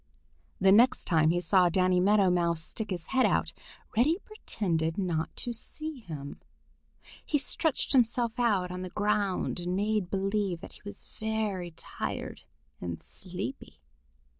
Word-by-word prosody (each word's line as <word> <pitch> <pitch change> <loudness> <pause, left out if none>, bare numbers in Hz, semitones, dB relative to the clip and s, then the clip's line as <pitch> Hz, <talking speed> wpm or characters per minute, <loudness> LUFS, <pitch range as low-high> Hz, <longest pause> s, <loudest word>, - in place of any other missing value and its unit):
The 190 0 +5
next 235 +6 +5
time 160 -2 +3
he 175 +2 +2
saw 180 +1 +4
Danny 185 +1 +3
Meadow 195 0 +4
Mouse 170 -2 +1
stick 215 +6 -6
his 180 -4 -3
head 260 -1 +4
out, - - 0 0.4
Reddy 285 +10 +4
pretended 170 - -2
not 170 -5 -1
to 240 - -2
see 305 +5 -5
him. 150 - -8 0.8
He 300 - +1
stretched 315 +1 +1
himself 240 -2 +2
out 200 -7 +2
on 180 0 -5
the 185 - -5
ground 205 -2 0
and 175 +1 -2
made 205 -2 0
believe 195 -2 -1
that - - -10
he - - -16
was 205 - -9
very 215 -5 -1
tired 160 - -6 0.3
and 85 -2 -5
sleepy. 190 +8 -7
195 Hz, 145 wpm, -29 LUFS, 175-220 Hz, 0.8 s, The